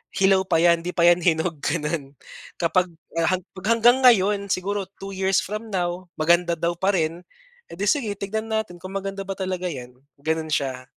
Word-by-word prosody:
hilaw 190 0 +4
pa 160 - +2
'yan, 170 0 +4
'di 180 - -3
pa 170 0 +4
'yan 175 0 +6
hinog, 160 -1 +1
gano'n. 150 -2 -2 0.5
Kapag, 180 +2 +2 0.3
ah, 165 +1 +2
hag 185 - -8 0.2
hanggang 230 +4 +4
ngayon, 205 -4 +4
siguro 195 +2 -1 0.2
2 195 0 -7
years 190 0 +2
from 215 +2 -6
now, 180 0 -2
maganda 170 +1 +3
daw 170 0 0
pa 190 +3 +1
rin, 165 +1 -1 0.5
edi 190 +4 -5
sige, 230 -4 +1
tignan 220 +3 -3
natin 220 -5 -2
kung 185 - -7
maganda 195 0 -4
ba 195 - -3
talaga 185 -1 -2
'yan, 125 -2 -9 0.2
gano'n 160 +1 -2
siya. 130 -3 -1
180 Hz, 180 wpm, -23 LUFS, 170-195 Hz, 0.5 s, yan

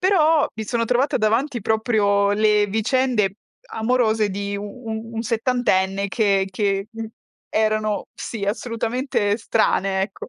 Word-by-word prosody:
però 325 -5 +4
mi 220 - -4
sono 230 +2 -1
trovata 250 +4 +2
davanti 235 +4 +1
proprio 210 -2 +2
le 210 0 +3
vicende 220 -1 +1 0.4
amorose 220 -2 +1
di 200 +1 -3
u 200 - -5
u 225 +1 -7
un 225 - -2
settantenne, 220 -5 +1
che 195 -2 +2
che, 195 0 -1
mhmm, 225 -1 -6 0.4
erano 215 -1 0
sì, 215 -4 -5
assolutamente 230 0 -1
strane, 195 -4 +1
ecco. 195 0 -6
220 Hz, 130 wpm, -22 LUFS, 200-240 Hz, 0.4 s, però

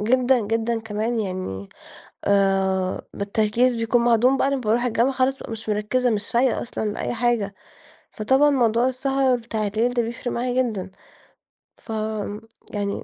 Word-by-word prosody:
جدًا، 250 +3 +3
جدًا 225 +1 0
كمان 225 +2 -2
يعني 185 - -4 0.6
آآ، 195 -2 +1
بالتركيز 220 +5 +1
بيكون 230 +1 +1
معدوم 240 +3 +4
بعد 275 +1 +1
ما 275 - 0
باروح 235 +1 +1
الجامعة 245 +2 +2
خلاص 265 +1 +1
بقى - - -9
مش 220 0 -7
مركزة 215 +4 +1
مش 210 -2 -2
فايقة 245 +1 +2
أصلًا 230 - -4
لأي - - -3
حاجة. 230 -4 0 0.6
فطبعًا 265 +7 +3
موضوع 240 -3 +2
السهر 265 0 +1
بتاع 225 -2 -3
الليل 225 +4 0
ده 240 - +2
بيفرق 235 +2 -5
معايا 250 +1 +1
جدًا. 200 -6 -4 0.9
ف - - -11
آمم، 215 -1 -3 0.3
يعني. 200 -1 -2
230 Hz, 150 wpm, -23 LUFS, 210-250 Hz, 0.9 s, معدوم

